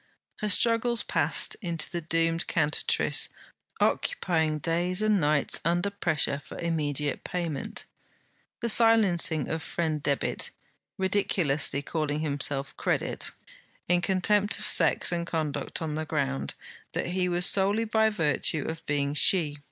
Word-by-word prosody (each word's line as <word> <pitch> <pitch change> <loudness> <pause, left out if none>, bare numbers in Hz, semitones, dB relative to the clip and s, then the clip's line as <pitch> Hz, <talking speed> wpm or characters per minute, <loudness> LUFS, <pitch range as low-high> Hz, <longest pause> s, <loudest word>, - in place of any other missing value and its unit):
Her 210 - -3
struggles 230 +3 +3
passed - - +2
into 170 -5 -1
the 175 -2 -5
doomed 165 +1 0
CANTATRICE 155 -2 +1 0.5
occupying 160 - 0
days 175 +4 -1
and 215 -2 +2
nights 145 -1 +1
under 175 +4 0
pressure 155 -7 0
for - - -11
immediate 150 -4 -2
payment; 170 -5 -4 0.8
the 235 - -1
silencing 195 - +3
of 160 0 -3
friend 160 -3 -3
Debit, 140 -1 -1 0.5
ridiculously 175 -7 0
calling 155 -1 -3
himself 140 -2 0
Credit, - - 0 0.6
in 175 0 +2
contempt 205 +3 +1
of - - -2
sex - - +3
and 170 -1 -3
conduct, 160 -1 -3
on 155 -2 -4
the 155 +1 -3
ground, 140 -3 -3 0.4
that - - -2
he 180 0 -1
was 175 0 +3
he - - +8
solely 200 +3 +2
by 220 0 +2
virtue 160 -5 0
of 160 0 -6
being 145 -1 -1
she. 150 -2 +3
165 Hz, 135 wpm, -27 LUFS, 150-190 Hz, 0.8 s, he